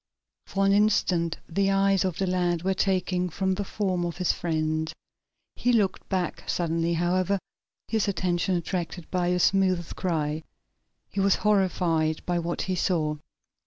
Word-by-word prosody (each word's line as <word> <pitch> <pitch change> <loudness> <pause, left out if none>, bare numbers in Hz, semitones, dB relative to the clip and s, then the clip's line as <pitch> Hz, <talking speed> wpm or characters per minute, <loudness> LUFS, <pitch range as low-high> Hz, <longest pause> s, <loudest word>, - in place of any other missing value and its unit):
For 195 0 0
an 195 - +4
instant 185 -5 +2
the 195 +3 +1
eyes 195 0 +3
of 185 -4 -2
the 195 - 0
lad 175 -2 0
were 190 +1 +2
taken 185 -2 0
from 190 +3 0
the 205 +2 -2
form 190 -3 -1
of 170 -2 -3
his 180 -1 +2
friend. 155 -1 -1 0.6
He 245 - +1
looked 210 -5 +1
back 185 -3 -2
suddenly, 165 0 0
however, 180 +3 +1 0.5
his 220 -2 0
attention 180 -1 0
attracted 175 0 -4
by 180 -1 +1
a 180 0 +2
smothered 185 -2 +2
cry. 155 -4 -1 0.7
He 200 - -3
was 195 0 +4
horrified 175 -6 +1
by 175 -1 0
what 170 0 -2
he 185 - -1
saw. 160 -4 0
180 Hz, 155 wpm, -26 LUFS, 170-195 Hz, 0.7 s, an